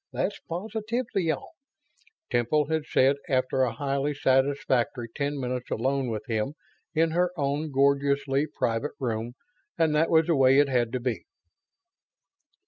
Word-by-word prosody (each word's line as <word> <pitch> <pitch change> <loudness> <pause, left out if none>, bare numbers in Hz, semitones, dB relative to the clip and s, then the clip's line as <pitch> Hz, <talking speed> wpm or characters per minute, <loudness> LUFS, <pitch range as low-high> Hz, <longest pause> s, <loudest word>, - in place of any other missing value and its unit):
That's 200 - -2
positively 215 +1 -2
all," 160 - -3 0.8
Temple 145 +6 +1
had 160 -1 -1
said, 135 +2 +3
after 130 0 +1
a 125 -2 +2
highly 140 +3 -1
satisfactory 130 -4 +1
ten 145 0 -2
minutes 125 -1 -3
alone 135 +2 0
with 110 -2 -4
him 110 +4 -2 0.4
in 160 +1 +3
her 175 +2 +2
own 145 +2 -1
gloriously 140 +1 +2
private 120 -1 -2
room, 115 -2 -2 0.4
and 160 -2 +2
that 155 +2 +2
was 160 -1 +4
the 170 -1 +2
way 135 -1 +5
it 145 -1 +4
had 120 -3 +1
to 125 - 0
be. 125 -1 -3
140 Hz, 140 wpm, -27 LUFS, 130-155 Hz, 0.8 s, way